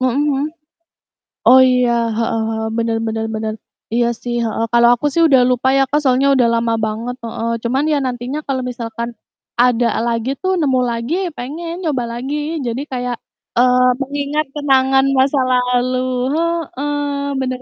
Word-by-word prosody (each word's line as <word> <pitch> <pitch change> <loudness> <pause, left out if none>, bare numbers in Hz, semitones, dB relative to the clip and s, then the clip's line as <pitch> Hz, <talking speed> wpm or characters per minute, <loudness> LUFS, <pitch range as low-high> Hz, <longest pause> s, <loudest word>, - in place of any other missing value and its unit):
Mhm 255 +2 +1
mhm. 275 +1 0 1.0
Oh 260 +1 +8
iya, 250 -1 +3 0.3
heeh 225 -1 0
heeh. 220 0 -2
Bener 230 0 0
bener 220 0 -2
bener. 215 0 -3 0.4
Iya 235 0 +2
sih, 240 -1 -3
heeh, 225 0 -1
kalau 235 0 +6
aku 245 - -3
sih 335 - +2
udah 265 -4 +5
lupa 255 +1 +1
ya - - +4
Kak, 295 - +2
soalnya 265 0 +3
udah 250 -3 +4
lama 230 0 0
banget, 225 +3 -4
heeh. 230 0 -3
Cuman 260 +4 0
ya 300 - +2
nantinya 250 +3 -3
kalau 265 -2 -1
misalkan 235 -1 -5 0.5
ada 245 -1 +3 0.2
lagi 230 +1 -1
tuh, 375 0 0
nemu 265 -4 +2
lagi 235 +6 -3
ya - - -2
pengen 315 +7 -5
nyoba 280 -6 -1
lagi. 265 +5 -4 0.3
Jadi 240 +4 -2
kayak, 250 -1 -2 0.4
eee, 250 +1 +4 0.2
mengingat 285 +2 -2
kenangan 270 -2 +3
masa 270 +2 +3
lalu. 250 0 +1 0.4
Heeh, 315 -4 -2 0.4
bener 255 -1 -3
250 Hz, 160 wpm, -18 LUFS, 235-275 Hz, 1.0 s, Oh